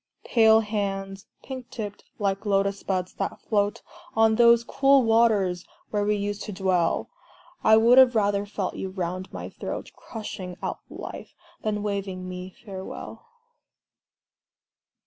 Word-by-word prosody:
Pale 220 -1 +5
hands, 195 -2 -3 0.2
pink 260 -2 -7
tipped, 205 -3 -6
like 195 -2 -1
Lotus 200 -1 +1
buds 185 -2 -2
that - - -4
float 205 -1 0 0.3
On 220 0 +5
those 235 0 +6
cool 275 +2 +4
waters 215 -6 +3 0.3
where 205 -1 +1
we 210 +1 +2
used 205 0 -3
to 210 - -5
dwell, 185 -3 0 0.5
I 220 - +7
would 235 +3 +7
have 255 -2 +6
rather 205 -1 +1
felt 200 -2 -3
you 190 - -4
round 185 0 -4
my - - -6
throat, - - -6
Crushing 190 -5 -7
out - - -3
life, - - -8 0.3
than 210 -1 -1
waving 195 -3 -3
me 180 0 -6 0.2
farewell! 195 - -8
205 Hz, 135 wpm, -26 LUFS, 195-220 Hz, 0.5 s, I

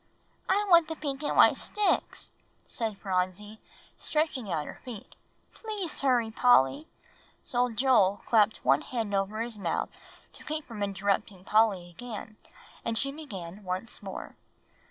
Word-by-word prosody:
"I 410 +2 +3
want 340 -4 +6
the 320 - -4
pink 280 -3 -4
and 295 - -1
white - - +8
sticks," 420 -1 -1 0.3
said 220 -3 -3
Phronsie, 195 +3 -2 0.4
stretching 300 - -1
out 155 -3 -1
her - - -10
feet. 230 -6 -9 0.4
"Please 420 -7 -4
hurry, 245 -5 +2
Polly." 245 - +4 0.6
So 245 0 +1
Joel 220 -5 +3
clapped 220 -2 +3
one 135 +1 +5
hand 225 -5 -3
over 200 +3 0
his 230 -2 -4
mouth - - -1 0.4
to - - -13
keep 310 0 -4
from 225 -3 -8
interrupting 200 -1 -1
Polly 210 -4 +3
again, 215 +2 -8 0.5
and 230 -1 -1
she 275 +3 0
began 205 - -8
once 185 +5 -4
more. 195 -2 -7
220 Hz, 140 wpm, -29 LUFS, 195-270 Hz, 0.6 s, white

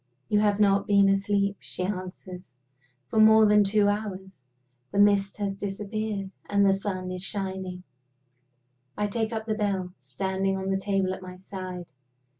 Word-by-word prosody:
"You 210 - +3
have 210 -1 +2
not 200 -1 +3
been 200 -1 +5
asleep," 200 0 +1
she 185 - -5
answers, 185 -4 -6 0.5
"for 220 - -1
more 220 0 +7
than 210 0 +5
two 205 +1 +3
hours. 190 -6 -4 0.5
The 200 - -4
mist 200 -1 +3
has 200 -2 -2
disappeared, 200 0 -4 0.2
and 200 0 +3
the 195 - +5
sun 190 -2 -3
is 185 0 -5
shining." 190 -2 -4 1.1
I 210 - 0
take 220 +2 -2
up 220 -1 -3
the 220 - -1
bell, 195 -4 -2
standing 190 +9 -2
on 190 0 -2
the 195 - +1
table 195 -1 0
at - - -8
my 185 0 -9
side. 185 -1 -7
195 Hz, 160 wpm, -27 LUFS, 190-205 Hz, 1.1 s, more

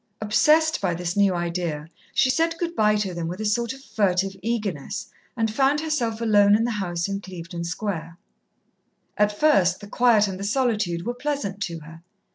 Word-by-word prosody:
Obsessed 305 +10 +3
by 180 -4 0
this 175 0 -3
new 200 -1 +4
idea, 170 -3 -3 0.2
she 260 -1 +3
said 330 +4 0
good 340 0 -3
bye 210 -4 +3
to 205 -3 -1
them 170 -1 -4
with 180 +3 -5
a 215 - -3
sort 230 +2 0
of 270 +1 -10
furtive 195 -3 0
eagerness, 210 -9 -3 0.3
and 225 -2 0
found 275 +4 +2
herself 270 -8 -1
alone 205 -2 +5
in 225 - +2
the 240 - 0
house 175 -5 -2
in 200 0 -3
Clevedon 170 -2 -7
Square. 170 -2 -4 1.0
At 210 0 +3
first 195 - +4
the 205 - -10
quiet 220 -1 +3
and 190 -1 -5
the - - -5
solitude 210 -7 0
were 240 - -1
pleasant 245 -7 -3
to 170 -2 -7
her. 165 +2 -12
205 Hz, 185 wpm, -24 LUFS, 180-235 Hz, 1.0 s, alone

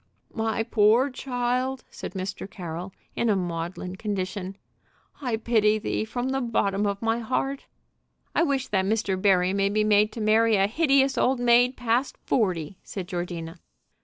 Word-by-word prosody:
"My 225 -1 -1
poor 225 +5 +3
child," 255 0 -2
said - - -8
Mr. 190 +1 -5
Carroll, 175 0 -6 0.2
in 235 - +1
a 210 - +3
maudlin 180 +1 -4
condition, 195 -1 -4 0.6
"I 245 -5 -1
pity 220 -2 +2
thee 215 0 -2
from 245 +3 -3
the 270 0 0
bottom 205 -4 0
of 200 +2 -3
my 225 +1 +1
heart!" 270 +4 -2 0.7
"I - - +2
wish 280 -5 +1
that 190 -2 +1
Mr. 210 -1 0
Barry 185 -2 +3
may 195 0 +2
be 215 +1 +1
made 210 0 +4
to - - -6
marry 220 +1 +4
a 195 -1 +4
hideous 275 +3 +2
old 255 0 +2
maid 245 +1 +4
past 245 +2 0
forty," 185 - 0
said 190 -3 -6
Georgina. 175 -2 -5
215 Hz, 160 wpm, -26 LUFS, 190-245 Hz, 0.7 s, made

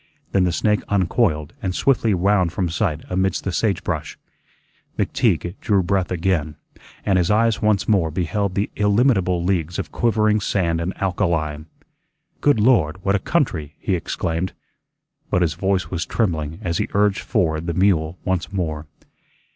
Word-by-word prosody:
Then 95 -2 +3
the 90 - +1
snake 105 +4 +1
uncoiled 90 -5 +1
and 90 -2 -2
swiftly 115 -6 +2
wound 90 -1 +2
from 90 0 -1
sight 80 -3 -1
amidst 95 0 0
the 95 - -2
sagebrush. 100 +3 -2 0.8
McTeague 85 - 0
drew 100 -3 +2
breath 95 0 0
again, 85 -4 -1 0.5
and 95 -2 +3
his 85 - +1
eyes 110 +1 +2
once 105 -3 +2
more 95 -7 +2
beheld 90 +4 -2
the 100 +1 -1
illimitable 100 -4 +2
leagues 85 -2 -1
of - - -4
quivering 110 -2 +2
sand 85 -4 0
and 85 +3 -4
alkali. 85 -6 0 0.8
"Good 145 -6 +3
Lord! 105 -9 +3
What 100 - +3
a 100 - +2
country!" 85 - -1
he 95 - -2
exclaimed. 85 0 -2 0.8
But 90 - +2
his 80 -3 0
voice 95 +3 -1
was 85 -2 -2
trembling 80 -8 -1
as 85 -3 -1
he - - 0
urged 105 -1 +3
forward 80 -1 0
the 85 - -2
mule 90 -3 +2
once 95 -2 -1
more. 80 -5 -3
95 Hz, 155 wpm, -21 LUFS, 85-100 Hz, 0.8 s, Then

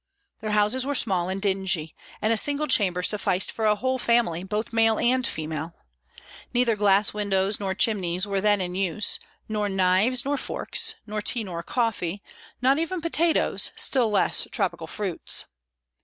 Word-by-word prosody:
Their 215 - -5
houses 210 +5 +3
were 285 +2 -2
small 185 -8 +1
and 190 +1 -3
dingy, 190 -5 -1 0.3
and 220 +1 +3
a - - +1
single 290 +6 +2
chamber 185 -10 +2
sufficed 195 -2 +1
for 220 - -3
a 210 - +4
whole 260 +4 -2
family, 235 -9 +1
both 210 +4 -4
male 225 -1 +3
and 255 +1 +1
female. 160 +1 -5 0.8
Neither 240 -2 +2
glass 205 0 +3
windows 200 -1 0
nor 190 -2 -3
chimneys 185 -4 0
were 200 -1 -2
then 205 -1 +2
in 180 -1 -3
use, 195 +2 -1 0.3
nor 210 -1 -2
knives 195 +7 +2
nor 285 0 -1
forks, 450 - -1
nor 210 0 -4
tea 230 +2 +1
nor 175 -4 -6
coffee; 205 -3 -2 0.4
not 270 +3 +3
even 345 +3 -2
potatoes, 335 0 +1
still 250 -5 +2
less 210 - +2
tropical - - -2
fruits. 195 -5 -1
210 Hz, 160 wpm, -25 LUFS, 190-240 Hz, 0.8 s, a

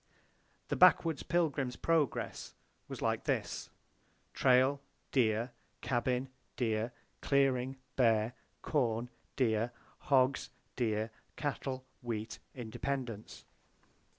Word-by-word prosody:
The - - +1
backwoods 165 -4 +5
Pilgrim's 145 -7 0
progress 160 -6 0 0.3
was - - -6
like - - 0
this: - - -1 0.6
Trail, 130 +2 +4 0.3
deer; 115 -1 +2 0.3
cabin, 125 +1 0 0.3
deer; 110 -1 0 0.3
clearing; 135 -2 +2 0.2
bear, 115 -2 +3 0.3
corn, 120 -4 0 0.2
deer; 115 -2 +2 0.3
hogs, 130 -1 +3 0.3
deer; 110 -2 0 0.2
cattle, 135 -3 -3 0.2
wheat, 115 -3 -4 0.2
independence. 120 -1 -4
125 Hz, 85 wpm, -33 LUFS, 115-135 Hz, 0.6 s, backwoods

